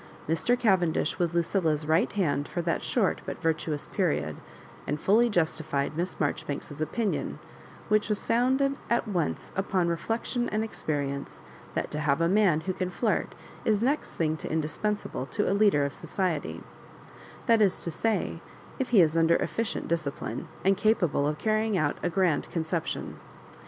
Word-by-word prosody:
Mr. 165 +10 +2
Cavendish 190 -9 +2
was 170 -1 0
Lucilla*s 165 -3 +1
right 160 +8 +2
hand 145 -8 0
for 175 - -3
that 170 0 0
short 215 -7 +1
but - - -4
virtuous 160 -2 -1
period, 110 - 0 0.5
and 150 +1 -1
fully 225 +8 +4
justified 155 -6 0
Miss 175 +3 -2
Maijoribanks's 145 0 -3
opinion, 205 +7 -1 0.5
which 215 +1 +2
was 210 -1 -1
founded 265 +4 +2
at 235 -1 +1
once 175 -7 -2
upon 190 -2 +1
reflec 170 +7 -2
tion 245 -1 -1
and 215 +1 0
experience, 140 -9 -3 0.3
that - - -2
to 150 - -2
have 150 0 +1
a 165 - +3
man 185 -4 +3
who 185 +3 -2
can 185 0 -2
flirt 215 +4 -1 0.3
is 215 0 +2
next 280 +5 0
thing 155 -1 +1
to - - -6
indispensable 160 -1 -2
to - - -1
a - - +2
leader 200 -8 +4
of 140 - -3
society; 180 -6 -2 0.8
that 230 -3 +4
is 195 -3 +3
to 170 - -3
say, 220 +7 -1 0.4
if 265 - -1
he 220 -6 +6
is 160 -1 +3
under 165 0 +4
efficient 225 -1 -2
dis 170 -2 0
cipline, 140 - -4 0.2
and 195 0 +4
capable 175 -9 +2
of 150 0 -1
carrying 215 0 +1
out 155 -4 0
a 175 - 0
grand 175 -4 +1
con 165 - -1
ception. 160 0 -3
175 Hz, 165 wpm, -28 LUFS, 155-215 Hz, 0.8 s, he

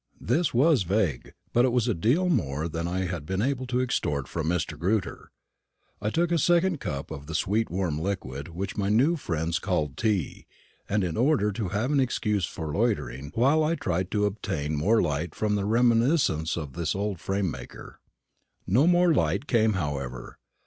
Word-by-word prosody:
This 170 -1 +1
was 140 +1 +4
vague, 95 - -1 0.2
but 120 - +4
it 130 - +3
was 125 -1 +1
a 120 - +2
great 85 - -9
deal 155 - +3
more 75 - 0
than 85 +1 -3
I 90 +2 -1
had 85 -4 -4
been 95 +5 -3
able 130 -1 -1
to 125 0 0
extort 75 - -1
from 80 +1 -3
Mr. 85 -1 -1
Grewter. 95 +3 -2 0.7
I 105 - 0
took 170 +8 0
a 170 - +2
second 175 +1 +2
cup 70 - -5
of 70 -2 -7
the 80 - -5
sweet 110 +6 +1
warm 85 -5 -1
liquid 80 -7 -4
which 90 +4 -5
my 100 -1 -1
new 130 +11 +3
friends 85 - -2
called 75 -4 -1
tea, 105 -8 -1 0.4
in 95 -5 0
order 125 -4 +2
to 100 0 -3
have 110 +8 -1
an 145 - +3
excuse 105 -7 0
for 80 -2 -5
loitering, 70 - -1
while 140 +7 +3
I 160 +2 +1
tried 90 - -2
to 105 -1 +2
obtain 80 -7 -2
more 105 +10 +3
light 75 +2 -2
from 105 -1 0
the 100 -1 0
reminiscences 115 - +2
of 75 -5 -5
the 85 -2 -2
old 100 -3 -2
frame 95 -1 -1
maker. - - -10 0.7
No 125 - +3
more 175 -1 +4
light 90 - +1
came, 110 -5 +2
however. 70 -8 -4
100 Hz, 185 wpm, -27 LUFS, 80-120 Hz, 0.7 s, was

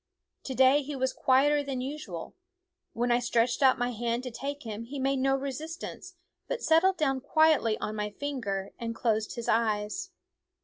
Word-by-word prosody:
To 260 - -4
day 265 +3 +5
he 290 +1 -6
was 260 0 0
quieter 285 +3 +3
than 275 -2 -4
usual; 255 - -6 0.6
when 240 +1 0
I 240 - +4
stretched 240 +1 +1
out 265 -1 +5
my 245 -1 0
hand 235 +1 -2
to 250 - -5
take 285 +4 -5
him 225 0 -6
he 275 +4 -7
made 270 0 0
no 270 +1 +2
resistance, 315 +7 -6 0.3
but - - -3
settled 345 +4 +4
down 270 -4 +1
quietly 285 -6 +3
on 215 - -4
my 210 0 -2
finger 205 -6 -4
and 230 -1 -4
closed 220 -2 0
his 235 -2 -5
eyes. 220 - 0
260 Hz, 175 wpm, -29 LUFS, 230-285 Hz, 0.6 s, day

